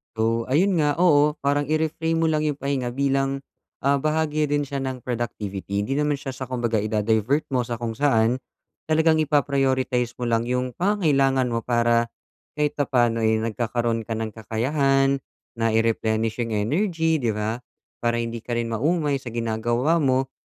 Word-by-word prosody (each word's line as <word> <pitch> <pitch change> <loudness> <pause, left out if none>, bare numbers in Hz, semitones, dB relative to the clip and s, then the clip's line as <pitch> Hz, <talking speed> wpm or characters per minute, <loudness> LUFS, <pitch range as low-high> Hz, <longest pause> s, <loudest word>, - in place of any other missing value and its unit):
Though, 115 +1 0
ayun 175 +6 +2
nga, 145 -1 +2
oo, 150 -3 +4
parang 145 0 +1
i-reframe 160 +1 0
mo 165 - +3
lang 155 0 0
'yong 150 -2 0
pahinga 130 -3 -2
bilang, 135 0 0 0.4
ah, 140 0 +3
bahagi 155 0 0
rin 145 0 +1
siya 140 0 -4
ng 130 -2 -4
productivity. 100 -5 -3
'Di 135 +6 -2
naman 150 0 +1
siya 135 -1 -6
sa 130 0 -7
kumbaga 120 -4 0
i-da-divert 110 +6 +1
mo 125 -2 +1
sa 120 - -3
kung 115 -1 -4
saan, 125 -3 +2 0.5
talagang 160 0 +3
ipa-prioritize 135 -4 +1
mo 125 - -6
lang 115 +1 +1
'yong 125 0 -1
pangangailangan 140 -10 +2
mo 115 - 0
para 120 -1 +2 0.5
kahit 150 -1 +1
papaano 120 -5 +2
ay 110 0 +3
nagkakaroon 115 0 -1
ka 115 - -2
ng 110 -1 -3
kakayahan, 135 +5 +1 0.4
na 115 -1 +1
i-replenish 110 0 +1
'yong 115 -2 -1
energy, 160 - +1
di 120 -5 0
ba? 105 +2 -2 0.4
Para 120 0 0
hindi 115 0 -4
ka 120 - -3
rin 115 0 -1
maumay 145 +5 +1
sa 120 -3 -8
ginagawa 120 +7 0
mo, 135 -3 +1
130 Hz, 165 wpm, -24 LUFS, 115-145 Hz, 0.5 s, oo